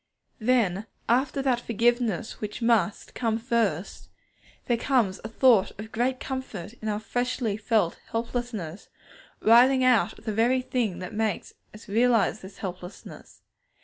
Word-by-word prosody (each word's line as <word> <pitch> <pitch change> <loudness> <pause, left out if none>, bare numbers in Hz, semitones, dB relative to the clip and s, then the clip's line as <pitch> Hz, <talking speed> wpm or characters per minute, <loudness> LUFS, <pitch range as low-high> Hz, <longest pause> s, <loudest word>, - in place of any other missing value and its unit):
Then, 220 -4 +1 0.2
after 265 +3 +1
that 255 -3 +2
forgiveness 235 0 0
which 210 -1 -5
must 230 -5 +1
come 225 -2 0
first, 225 -7 -1 0.6
there 240 - +2
comes 230 -6 +1
a - - -4
thought 225 -5 +3
of 220 +1 -8
great 250 +3 0
comfort 250 -8 -6
in 220 - -4
our 210 -1 -1
freshly 245 -1 -2
felt 210 -4 0
helplessness, 225 -7 -4 0.5
rising 255 +4 +6
out 225 -6 +3
of - - -18
the 215 - -2
very 245 +4 +2
thing 230 -8 -1
that 180 - -7
makes 215 -3 -2 0.2
us 215 +2 -14
realize 225 -1 +2
this 190 +1 -11
helplessness. 180 -1 -9
225 Hz, 140 wpm, -26 LUFS, 205-245 Hz, 0.6 s, rising